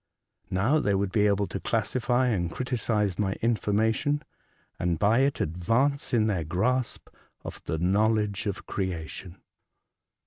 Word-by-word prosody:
Now 110 Hz, +12 st, +2 dB
they 100 Hz, -9 st, +1 dB
would 95 Hz, -1 st, 0 dB
be 105 Hz, 0 st, +3 dB
able 100 Hz, 0 st, +2 dB
to 95 Hz, -, -5 dB
classify 120 Hz, +4 st, 0 dB
and 90 Hz, -7 st, 0 dB
criticise 110 Hz, -6 st, -1 dB
my 95 Hz, -2 st, +1 dB
information, 110 Hz, +6 st, 0 dB, 0.6 s
and 85 Hz, -2 st, 0 dB
by 105 Hz, +7 st, +3 dB
it 135 Hz, +1 st, +1 dB
advance 115 Hz, -, 0 dB
in 115 Hz, -4 st, +3 dB
their 95 Hz, -6 st, 0 dB
grasp 120 Hz, -, -1 dB, 0.4 s
of -, -, -8 dB
the 80 Hz, -, -2 dB
know 95 Hz, +6 st, +3 dB
ledge 105 Hz, -2 st, -1 dB
of 100 Hz, -, -4 dB
creation." 90 Hz, 0 st, -5 dB
105 Hz, 140 wpm, -27 LUFS, 95-120 Hz, 0.6 s, be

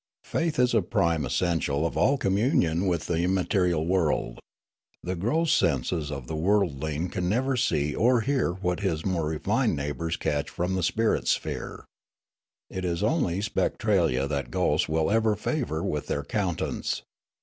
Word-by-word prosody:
Faith 165 Hz, -2 st, -1 dB
is 125 Hz, -1 st, +3 dB
a 110 Hz, -, +4 dB
prime 85 Hz, -3 st, +1 dB
essential 80 Hz, -4 st, 0 dB
of 85 Hz, -, -2 dB
all 140 Hz, +1 st, +3 dB
communion 95 Hz, -, +1 dB
with 85 Hz, -3 st, 0 dB
the 85 Hz, -1 st, -1 dB
immaterial 90 Hz, -2 st, +1 dB
world. 85 Hz, -3 st, 0 dB, 0.6 s
The 90 Hz, +1 st, -2 dB
gross 155 Hz, -, +1 dB
senses 80 Hz, -, +1 dB
of 70 Hz, -3 st, -5 dB
the 80 Hz, -, -5 dB
worldling 80 Hz, -3 st, 0 dB
can 90 Hz, -1 st, -2 dB
never 130 Hz, +6 st, +1 dB
see 75 Hz, -, +1 dB
or 120 Hz, +1 st, +3 dB
hear 130 Hz, -5 st, +1 dB
what 90 Hz, -1 st, -2 dB
his 85 Hz, -6 st, -1 dB
more 85 Hz, -5 st, 0 dB
refined 75 Hz, -1 st, 0 dB
neighbours 75 Hz, +4 st, -3 dB
catch 75 Hz, -1 st, -1 dB
from 90 Hz, +2 st, -2 dB
the 95 Hz, -, 0 dB
spirit 110 Hz, +6 st, +1 dB
sphere. -, -, -2 dB, 0.8 s
It 95 Hz, -, -5 dB
is 85 Hz, +1 st, -1 dB
only 105 Hz, -, +1 dB
Spectralia 95 Hz, -, +1 dB
that 70 Hz, -4 st, -3 dB
ghosts -, -, +1 dB
will 80 Hz, +3 st, +1 dB
ever 110 Hz, -1 st, +3 dB
favour 105 Hz, -, -2 dB
with 75 Hz, -1 st, -2 dB
their 70 Hz, -, -2 dB
countenance. 90 Hz, +1 st, -2 dB
90 Hz, 155 wpm, -27 LUFS, 80-105 Hz, 0.8 s, a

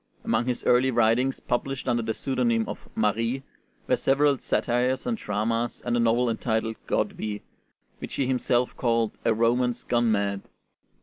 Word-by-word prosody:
Among 120 Hz, -, 0 dB
his 125 Hz, -1 st, -2 dB
early 125 Hz, +2 st, +4 dB
writings, 120 Hz, +2 st, +2 dB
published 130 Hz, +2 st, -3 dB
under 120 Hz, -1 st, +2 dB
the 110 Hz, 0 st, -2 dB
pseudonym 120 Hz, -4 st, 0 dB
of -, -, -8 dB
'Marie,' 115 Hz, +5 st, 0 dB, 0.4 s
were -, -, +3 dB
several 140 Hz, 0 st, +2 dB
satires 125 Hz, +2 st, 0 dB
and 235 Hz, -, 0 dB
dramas 115 Hz, -, -2 dB
and 120 Hz, -1 st, 0 dB
a -, -, +2 dB
novel 115 Hz, +1 st, +3 dB
entitled 110 Hz, -1 st, -1 dB
'Godwi,' 110 Hz, -, -2 dB, 0.6 s
which -, -, -7 dB
he 135 Hz, -, 0 dB
himself 125 Hz, -1 st, +1 dB
called 115 Hz, -3 st, +1 dB
"a -, -, +4 dB
romance 120 Hz, +2 st, +1 dB
gone 120 Hz, -1 st, +1 dB
mad." 100 Hz, -1 st, 0 dB
120 Hz, 150 wpm, -26 LUFS, 115-125 Hz, 0.6 s, early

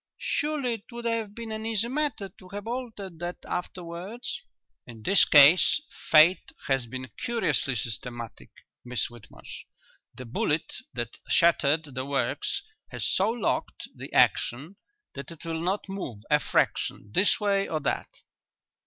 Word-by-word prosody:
"Surely 290 Hz, -5 st, -1 dB
it 225 Hz, +2 st, -9 dB
would 235 Hz, 0 st, -7 dB
have 225 Hz, -3 st, -1 dB
been 230 Hz, -1 st, -6 dB
an 220 Hz, 0 st, -4 dB
easy 225 Hz, 0 st, +1 dB
matter 275 Hz, -6 st, -1 dB
to 185 Hz, -1 st, -17 dB
have 200 Hz, +1 st, -6 dB
altered 225 Hz, -8 st, -5 dB
that 175 Hz, +1 st, -4 dB
afterwards?" 180 Hz, +6 st, -5 dB, 0.5 s
"In 115 Hz, -3 st, -11 dB
this 195 Hz, -, +6 dB
case 150 Hz, -, +7 dB, 0.3 s
fate 160 Hz, +4 st, +6 dB
has 135 Hz, -4 st, +1 dB
been 130 Hz, +2 st, -6 dB
curiously 170 Hz, -, +1 dB
systematic, 115 Hz, -, -5 dB, 0.3 s
Miss 125 Hz, -2 st, -2 dB
Whitmarsh. 100 Hz, -, -11 dB, 0.5 s
The 130 Hz, -, -8 dB
bullet 150 Hz, +6 st, -1 dB, 0.2 s
that 120 Hz, -2 st, -4 dB
shattered 155 Hz, -3 st, +3 dB
the 130 Hz, 0 st, -3 dB
works 400 Hz, -, -1 dB, 0.3 s
has -, -, -2 dB
so 195 Hz, +3 st, +3 dB
locked 230 Hz, -2 st, -2 dB
the -, -, -8 dB
action 145 Hz, +11 st, +2 dB, 0.4 s
that 140 Hz, -1 st, -7 dB
it 165 Hz, -1 st, -11 dB
will 165 Hz, -1 st, -3 dB
not 190 Hz, +5 st, -1 dB
move 145 Hz, -, -6 dB
a 150 Hz, -, +6 dB
fraction 105 Hz, -7 st, 0 dB
this 200 Hz, -, +4 dB
way 200 Hz, -1 st, +1 dB
or 155 Hz, -, -1 dB
that." -, -, -1 dB
175 Hz, 145 wpm, -27 LUFS, 135-220 Hz, 0.5 s, case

